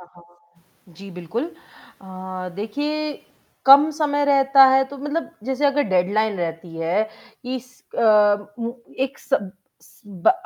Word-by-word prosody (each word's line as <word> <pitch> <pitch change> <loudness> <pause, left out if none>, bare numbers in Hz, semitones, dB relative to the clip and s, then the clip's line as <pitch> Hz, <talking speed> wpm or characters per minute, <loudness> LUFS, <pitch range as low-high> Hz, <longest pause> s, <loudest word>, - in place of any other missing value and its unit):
हाँ, 180 - -15
हाँ। 175 0 -25
जी 195 +2 -11
बिल्कुल। 180 - -4 0.6
अ, - - -15 0.5
देखिए 295 +9 -3 0.5
कम 280 +3 +8
समय 290 -1 0
रहता 275 -1 +6
है 265 0 +4
तो 280 - -8
मतलब 295 +4 -4
जैसे 265 +3 -2
अगर 285 +1 +2
डेडलाइन 200 +3 +1
रहती 165 0 -5
है 165 +6 0 0.4
कि 255 +1 -4
स 255 0 -24 0.2
अ, 210 -2 +4
उ 235 0 -3 0.3
एक 270 +1 -3
स 275 - 0 0.7
ब 190 -4 +2
230 Hz, 140 wpm, -22 LUFS, 180-280 Hz, 0.7 s, कम